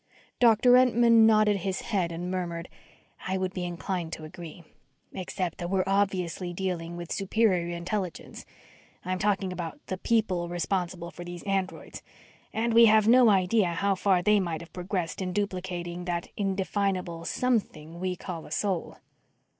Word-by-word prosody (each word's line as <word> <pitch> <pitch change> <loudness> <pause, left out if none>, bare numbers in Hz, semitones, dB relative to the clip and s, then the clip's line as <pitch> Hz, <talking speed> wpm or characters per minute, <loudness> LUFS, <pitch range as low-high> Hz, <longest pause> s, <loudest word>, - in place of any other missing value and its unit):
Doctor 235 0 +5
Entman 235 -3 +5
nodded 215 -2 +4
his 190 0 -3
head 185 -6 -1
and 175 +2 -4
murmured, 170 -2 -4 0.6
"I 190 +1 0
would 185 0 -2
be 180 - -3
inclined 175 -1 -4
to 160 - -6
agree. 165 +2 -10 0.5
Except 185 -2 -4
that 175 - -3
we're 190 0 +1
obviously 190 -3 0
dealing 175 -2 -3
with 170 -1 -7
superior 190 -4 +1
intelligence 185 +1 -4 0.6
I'm 185 0 -2
speaking 195 -2 0
about 170 -3 -6
the 185 - -5
"people" 190 -7 0
responsible 175 0 -2
for 175 - -9
these 175 -1 -8
androids 195 -2 -3 0.5
and 230 +1 0
we 230 0 +8
have 215 -1 +5
no 245 0 +7
idea 190 -1 +3
how 200 +3 +1
far 185 -1 +2
they 210 +2 +4
might 170 -4 -2
have 170 - -13
progressed 180 -1 -3
in 180 -1 -3
duplicating 180 -3 -3
that 175 -1 -3
indefinable 190 -3 -1
something 170 -9 -2
we 185 0 -2
call 170 -2 -7
a - - -15
soul." 185 +2 -2
185 Hz, 155 wpm, -27 LUFS, 175-205 Hz, 0.6 s, we